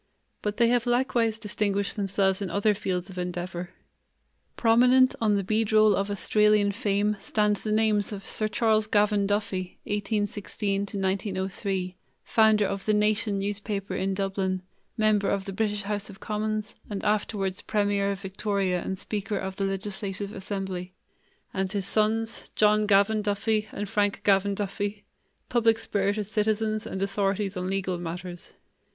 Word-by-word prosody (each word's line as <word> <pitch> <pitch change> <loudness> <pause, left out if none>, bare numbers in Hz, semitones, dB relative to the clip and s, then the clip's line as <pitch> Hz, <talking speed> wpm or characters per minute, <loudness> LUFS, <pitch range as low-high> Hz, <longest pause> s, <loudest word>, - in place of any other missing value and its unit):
But 210 0 -2
they 235 -1 +4
have 245 0 +2
likewise 240 -2 +2
distinguished 205 -2 -1
themselves 195 -1 +1
in 195 - -2
other 205 +4 +2
fields 185 -2 -3
of 180 - -7
endeavor. 180 0 -4 0.9
Prominent 250 +3 +5
on 215 -2 +3
the 200 - 0
beadroll 215 +1 +4
of 200 +2 -1
Australian 210 +1 +3
fame 205 -1 0
stand 210 0 +1
the 215 - -4
names 215 -2 +2
of 200 -2 -6
Sir 215 - -2
Charles 220 -2 +2
Gavan 205 -1 +2
Duffy 200 -3 -2
(1816 205 -1 -2 0.2
1903), 190 -1 -2 0.3
founder 220 -2 +4
of 195 0 -3
the 215 - +4
Nation 210 0 +2
newspaper 200 0 -3
in 190 +1 -1
Dublin, 190 -1 -1 0.3
member 215 -2 +3
of 195 -1 -1
the 195 - -5
British 210 0 -1
house 205 0 -3
of 195 - -12
commons, 215 0 -2 0.2
and 205 -2 -4
afterwards 205 -2 0
premier 205 -1 +1
of 200 -1 -3
Victoria 195 -2 -1
and 190 - -3
speaker 205 +1 -3
of 190 0 -4
the 195 - 0
legislative 195 +1 -4
assembly, 190 -2 -5 0.6
and 190 -1 -1
his 200 -2 0
sons, 220 +2 +1
John 210 0 +4
Gavan 205 +2 +4
Duffy 210 +1 0
and 205 +1 -4
Frank 205 -1 0
Gavan 200 0 +3
Duffy, 205 +1 -3 0.4
public 230 -2 +3
spirited 205 -1 -1
citizens 215 +1 0
and 190 -2 -3
authorities 195 0 0
on 180 0 -3
legal 190 -2 -1
matters. 175 +1 -7
205 Hz, 145 wpm, -27 LUFS, 195-215 Hz, 0.9 s, Prominent